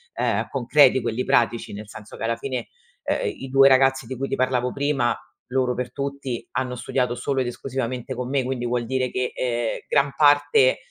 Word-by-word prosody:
ehm, - - 0
concreti, 130 0 +4
quelli 120 +2 -2
pratici, 120 -4 +1
nel 105 +1 -8
senso 105 0 -11
che - - -7
alla 115 +1 0
fine, 130 +2 -4 0.4
ehm, - - 0 0.2
i - - -8
2 135 +1 +6
ragazzi 135 -1 +4
di 130 +2 -6
cui 135 +2 -2
ti - - -1
parlavo 125 -1 0
prima, 140 -4 0 0.3
loro 125 0 0
per 125 0 -4
tutti, 140 -3 -4
hanno 130 -1 -2
studiato 125 0 -1
solo 135 +1 -1
ed 125 - -2
esclusivamente 125 -1 -4
con 125 0 -4
me, 135 -1 +1
quindi 125 -1 -3
vuol 120 0 -1
dire 130 +1 -1
che, 125 0 -1
ehm, 120 -2 -1
gran 140 -1 +2
parte, 145 -3 +4
130 Hz, 195 wpm, -23 LUFS, 120-135 Hz, 0.4 s, 2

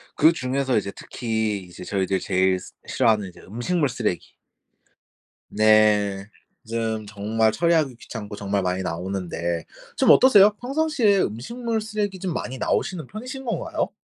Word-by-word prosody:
그중에서 135 -4 +2
이제 100 -1 -2
특히 110 -3 -2
이제 90 0 -11
저희들이 95 0 -1
제일 95 0 +2
스 - - -12 0.2
싫어하는 110 -5 +2
이제 90 - -16
음식물 135 - -1
쓰레기. 110 -7 -3 1.2
네. 105 -2 +3 0.4
좀 110 -2 -2
정말 110 +2 +1
처리하기 160 -3 +1
귀찮고 105 -3 -8
정말 100 -1 -1
많이 90 0 -1
나오는데 85 -1 -3 0.3
좀 - - +6
어떠세요? 210 -6 +7
평상시에 260 -7 +2
음식물 225 - -3
쓰레기 210 -3 -3
좀 185 -3 -3
많이 130 -3 -4
나오시는 165 +1 -1
편이신 255 +6 -7
건가요? 230 - -2
110 Hz, 325 characters per minute, -23 LUFS, -, 1.2 s, 어떠세요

